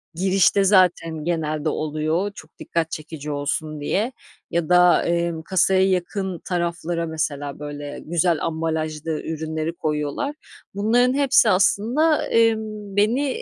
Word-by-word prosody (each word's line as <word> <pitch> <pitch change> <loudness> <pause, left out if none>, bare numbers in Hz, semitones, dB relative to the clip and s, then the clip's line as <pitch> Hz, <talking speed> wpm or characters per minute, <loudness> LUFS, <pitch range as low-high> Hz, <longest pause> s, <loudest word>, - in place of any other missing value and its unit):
girişte 190 +2 +3
zaten 175 -5 +3
genelde 155 -2 -1
oluyor 155 +6 -1
çok - - -14
dikkat 165 -1 -2
çekici 155 -1 -6
olsun 145 +1 -3
diye 215 - 0 0.4
ya 170 0 -1
da, 180 0 +5
emm, 170 -1 -1
kasaya 190 +1 +3
yakın 185 0 -2
taraflara 170 -1 -2
mesela, 145 -3 -3
böyle, 145 -1 -7
güzel 170 0 +1
ambalajlı 160 -1 -2
ürünleri 160 0 -3
koyuyorlar. 155 - -2 0.4
Bunların 240 +5 +3
hepsi 270 -5 +4
aslında, 235 - +2
emm, 220 -3 0
beni 255 +7 +1
170 Hz, 115 wpm, -22 LUFS, 155-200 Hz, 0.4 s, da